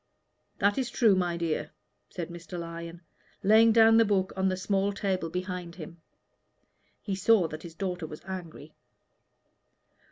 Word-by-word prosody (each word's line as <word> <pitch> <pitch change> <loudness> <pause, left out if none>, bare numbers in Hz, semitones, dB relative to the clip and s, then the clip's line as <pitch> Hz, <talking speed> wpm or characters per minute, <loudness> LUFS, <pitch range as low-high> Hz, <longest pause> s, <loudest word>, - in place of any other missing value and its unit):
"That 205 +4 +2
is 260 -1 -1
true, 230 -3 +4
my 175 -2 0
dear," 155 -3 -2 0.4
said 175 -3 -6
Mr. 175 +1 -8
Lyon, 170 0 -7 0.4
laying 220 +3 +6
down 225 0 +6
the 230 - +7
book 195 -3 0
on 190 0 +1
the 185 - -2
small 195 +1 0
table 190 -4 -2
behind 180 -1 -5
him. 170 -1 -10 1.0
He 200 - -3
saw 190 -1 +3
that 155 +1 -7
his 165 -1 -10
daughter 180 -3 -3
was 155 0 -10
angry. 170 -5 -8
185 Hz, 150 wpm, -28 LUFS, 170-200 Hz, 1.0 s, the